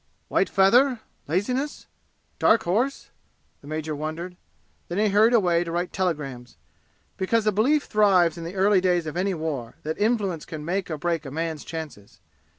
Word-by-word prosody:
"White - - +2
feather? 235 +6 +4 0.3
Laziness? 250 - -2 0.5
Dark 225 - +4
Horse?" 235 +11 -1 0.5
the 140 - -14
major 155 0 -3
wondered. 160 +4 -5 0.5
Then 175 - -4
he 210 0 +3
hurried 215 +4 +4
away 175 -6 +3
to 170 - -6
write 175 +1 -2
telegrams, 140 -9 -3 0.6
because 215 +4 +1
a 215 - +3
belief 270 +9 +2
thrives 195 -6 +3
in 170 - -7
the 170 +3 -7
early 195 0 +4
days 180 -2 +1
of 155 - -5
any 190 +1 0
war 145 -8 -4
that 155 +4 -4
influence 205 -7 0
can 155 -3 -7
make 185 +3 -2
or 155 - -3
break 165 0 -1
a 140 - -7
man's 160 +1 -3
chances. 155 -11 -8
180 Hz, 165 wpm, -25 LUFS, 160-210 Hz, 0.6 s, feather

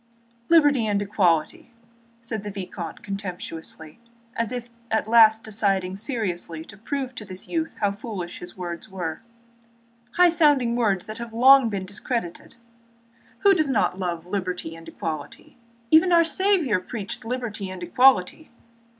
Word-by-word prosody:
"Liberty 290 -8 +5
and 205 -1 +1
equality," 185 -2 0 0.5
said 225 -2 -4
the 210 - -6
vicomte 190 -3 -7
contemptuously, 180 -4 -7 0.4
as 230 0 -1
if 245 -1 -5 0.2
at 220 -1 0
last 220 -1 +6
deciding 195 -4 0
seriously 185 - -4
to - - -13
prove 260 +5 -4
to 220 - -7
this 185 -2 -10
youth 325 -1 -3
how 205 -1 +2
foolish 200 -4 -6
his 175 +1 -11
words 175 +2 -6
were, 175 -5 -5 0.9
"high 355 0 +6
sounding 290 -8 +3
words 205 -6 0
which 215 +1 -7
have 235 -1 -7
long 260 +1 +6
been 195 -3 -3
discredited. 200 -1 -4 0.9
Who 400 -1 +6
does 310 -6 +1
not 210 -6 +1
love 175 -3 -3
liberty 180 -3 -4
and 165 0 -13
equality? 160 +8 -7 0.3
Even 320 +3 +6
our 340 -1 +6
Saviour 330 - +2
preached 200 +1 -7
liberty 225 -4 -4
and 185 -1 -7
equality. 255 - +3
210 Hz, 140 wpm, -24 LUFS, 185-250 Hz, 0.9 s, last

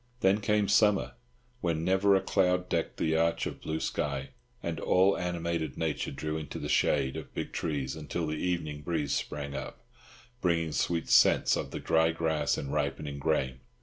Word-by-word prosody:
Then 95 +2 +3
came 105 0 +2
summer, 105 0 +3 0.5
when 80 -5 -1
never 95 +2 +4
a 95 - +3
cloud 90 -1 +1
decked 85 -1 -1
the 80 0 +1
arch 85 +1 +1
of - - -6
blue 80 0 -3
sky, 70 -4 -2 0.3
and - - -3
all 95 +2 +4
animated 85 -4 -2
nature 80 -2 -1
drew 75 +3 -3
into 80 -1 -6
the - - -4
shade 65 0 +2
of - - -8
big - - -3
trees 70 -5 -2
until 80 +2 -3
the 75 - -2
evening 80 -3 -2
breeze 75 -2 -1
sprang 70 -1 -3
up, - - -7 0.6
bringing 85 -3 +1
sweet 85 +2 0
scents - - +5
of - - -3
the - - -5
dry 80 0 +3
grass 80 -3 0
and 70 0 -4
ripening 70 -1 -2
grain. 65 -4 0
80 Hz, 175 wpm, -30 LUFS, 75-90 Hz, 0.6 s, scents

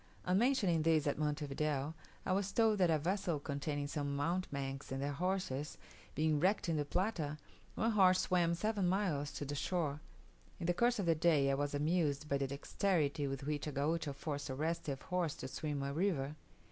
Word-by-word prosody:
On 180 - +2
mentioning 205 - +3
this 160 -1 +3
at 145 0 0
Monte 150 0 0
Video, 145 +1 -1 0.3
I - - 0
was 195 +1 +1
told 220 -1 +3
that 180 -2 +4
a 160 - +4
vessel 175 0 -1
containing 145 0 -3
some 145 -1 -2
mountebanks 140 -4 -2
and 135 - -2
their 140 +1 -1
horses, 170 -3 -2 0.4
being 155 -1 +2
wrecked 190 +4 +2
in 165 - +1
the 150 -1 0
Plata, 160 -3 -1 0.4
one 225 +1 +1
horse 185 -3 +5
swam 170 -2 +2
seven 205 +1 0
miles 175 -7 0
to 145 - -4
the 145 - -4
shore. 150 -1 -1 0.6
In - - -3
the 175 - +3
course 240 +6 +2
of 200 - -1
the 165 - +4
day 155 -4 +3
I - - +2
was 145 +1 -1
amused 150 -1 +1
by 140 -1 +1
the 135 - 0
dexterity 145 +1 0
with 135 0 -4
which 150 0 -2
a - - -2
Gaucho 150 +2 0
forced 145 0 -4
a 130 - -3
restive 150 -2 -2
horse 180 -4 -1
to 130 - -6
swim 145 +1 -3
a 140 0 -2
river. 155 -5 0
155 Hz, 195 wpm, -36 LUFS, 145-180 Hz, 0.6 s, horse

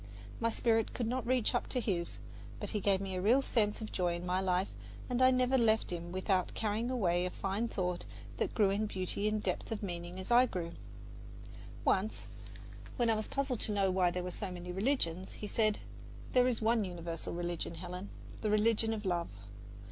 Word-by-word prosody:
My 230 - +2
spirit 225 -1 +1
could 240 - -1
not 245 +1 -1
reach 250 -3 +2
up - - 0
to 255 - -1
his, 180 -7 -2 0.4
but - - -4
he 210 - 0
gave 195 -1 +3
me 195 -1 -3
a 185 - -1
real 245 +8 +4
sense 210 -4 +1
of 215 - -5
joy 175 -2 +1
in 175 +1 -5
life, 185 +1 +1 0.4
and 250 0 0
I 255 - +8
never 255 +1 +3
left 220 -4 +3
him 175 0 -4
without 185 0 0
carrying 220 +2 0
away 180 -9 +2
a 180 - 0
fine 200 +5 -1
thought 180 -5 -2 0.3
that - - -1
grew 205 -3 +4
in 210 +2 0
beauty 190 +1 -2
and 215 0 0
depth 180 +3 -2
of 220 -1 -3
meaning 175 -1 -4
as 190 - -6
I 245 +2 +7
grew. 170 -6 -4 1.1
Once, 205 +3 +1 0.7
when 240 -3 +3
I - - +3
was 215 0 -2
puzzled 270 -4 -1
to - - -2
know 195 -2 +2
why 185 -1 +3
there 180 +1 -3
were 180 - -4
so 200 +2 -4
many 180 0 -6
religions, 190 -4 0
he - - -7
said: 215 0 +2 0.6
"There 250 0 +5
is 235 -3 0
one 225 0 +3
universal 170 -3 -5
religion, 175 -1 -3
Helen 180 +3 -6 0.3
the 215 - 0
religion 225 +1 +3
of 215 -1 -4
love. 175 -2 0
200 Hz, 200 wpm, -33 LUFS, 180-225 Hz, 1.1 s, I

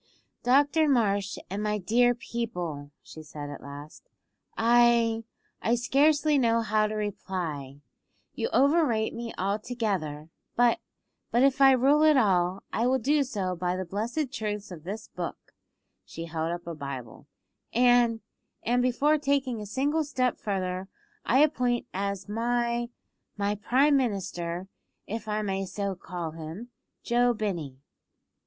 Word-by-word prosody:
"Doctor 290 +5 +3
Marsh, 205 -6 +1
and 195 +3 -4
my 210 0 0
dear 240 +5 +3
people," 180 -12 -4
she 160 - -11
said 150 -1 -8
at 145 - -8
last, 145 - -11 0.5
"I 230 -1 +4 0.4
I 235 - +2
scarcely 290 +4 +3
know 230 -2 +3
how 215 -1 +2
to 215 - -4
reply. 170 -9 -4 0.5
You - - -2
overrate 275 -6 +3
me 230 0 -5
altogether; 195 -7 -2 0.3
but 240 -1 +4 0.5
but, 240 +2 +3
if 275 0 +3
I 270 -1 +8
rule 275 +4 +4
at 310 -2 +6
all, 185 -4 +2
I 230 +2 +1
will 260 +1 +3
do 285 +5 +2
so 190 -8 -3
by 180 +1 -1
the 185 0 -3
blessed 235 - -3
truths 210 -2 -4
of 165 -3 -10
this 215 +4 -6
book - - -7 0.5
(she 165 - -8
held 165 0 -2
up 175 0 -5
a 170 - -5
Bible); 135 -6 -7 0.4
and 240 -2 +4 0.4
and 245 +2 +2
before 285 +5 +2
taking 275 -5 0
a 210 - -7
single 285 +8 0
step 255 -4 -1
further 185 -2 -2 0.4
I 265 +4 +5
appoint 250 -5 +1
as 200 0 -3
my 235 +2 0 0.5
my 205 0 0
Prime 265 +7 +3
Minister 185 -7 -2 0.4
if 220 +1 -5
I 215 0 -1
may 195 -1 -1
so 200 0 -3
call 175 -3 -6
him 165 +9 -8 0.3
Joe 240 0 +2
Binney." 175 -11 -3
220 Hz, 140 wpm, -28 LUFS, 185-245 Hz, 0.5 s, I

